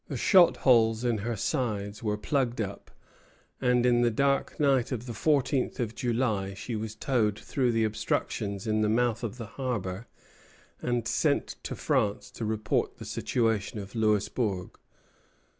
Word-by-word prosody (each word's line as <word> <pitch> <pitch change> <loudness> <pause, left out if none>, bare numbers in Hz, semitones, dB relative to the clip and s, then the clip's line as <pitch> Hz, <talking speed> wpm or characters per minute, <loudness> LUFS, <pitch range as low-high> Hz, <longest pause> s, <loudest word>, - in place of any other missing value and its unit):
The - - -4
shot 185 -4 +5
holes 115 -2 +4
in 120 -3 +1
her 115 +3 -2
sides 105 -4 -2
were 105 -2 -1
plugged 125 +2 -1
up, 100 -2 -4 0.7
and 125 -1 +3
in 120 -1 +4
the 120 - +4
dark 140 +4 0
night 135 -4 +2
of 125 -2 -3
the 120 - -5
fourteenth 140 0 +1
of 115 -3 -2
July 110 -6 -1
she 115 +4 -5
was 110 0 -4
towed 110 -5 +1
through 125 +2 0
the 115 -1 +1
obstructions 110 -1 -2
in 110 -1 +1
the 105 - +2
mouth 120 +1 +1
of 115 0 -4
the 115 - -6 0.2
harbor, 105 -4 -3 0.7
and 120 -2 -1
sent - - +1
to - - -5
France 100 -1 0
to 115 - -5
report 110 0 -1
the - - -9
situation 115 -3 -1
of 100 -1 -7
Louisbourg. 105 -3 0
115 Hz, 160 wpm, -28 LUFS, 105-125 Hz, 0.7 s, shot